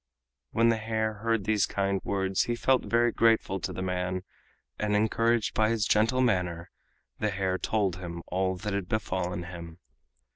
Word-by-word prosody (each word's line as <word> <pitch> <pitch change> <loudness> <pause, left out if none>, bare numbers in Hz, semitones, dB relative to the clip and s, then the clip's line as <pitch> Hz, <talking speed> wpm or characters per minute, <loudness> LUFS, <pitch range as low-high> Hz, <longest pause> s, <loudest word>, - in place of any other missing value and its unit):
When 115 - +3
the 115 - +2
hare 110 -1 -2
heard 115 -2 +1
these 105 0 +2
kind 100 -1 -1
words 95 -1 0
he 120 - -1
felt 130 +2 +2
very 120 0 +3
grateful 115 -5 +2
to - - -4
the 95 - -4
man, 90 0 -2 0.6
and 105 -1 +1
encouraged 115 +2 +2
by 110 0 +2
his 115 -2 +1
gentle 115 +5 +3
manner 90 -8 0 0.5
the 105 - +1
hare 95 -1 -1
told 100 -5 0
him 85 -2 -7
all 95 +1 0
that 100 +3 -4
had 100 -3 -3
befallen 90 -4 -2
him. 85 -2 -9
100 Hz, 170 wpm, -28 LUFS, 95-110 Hz, 0.6 s, When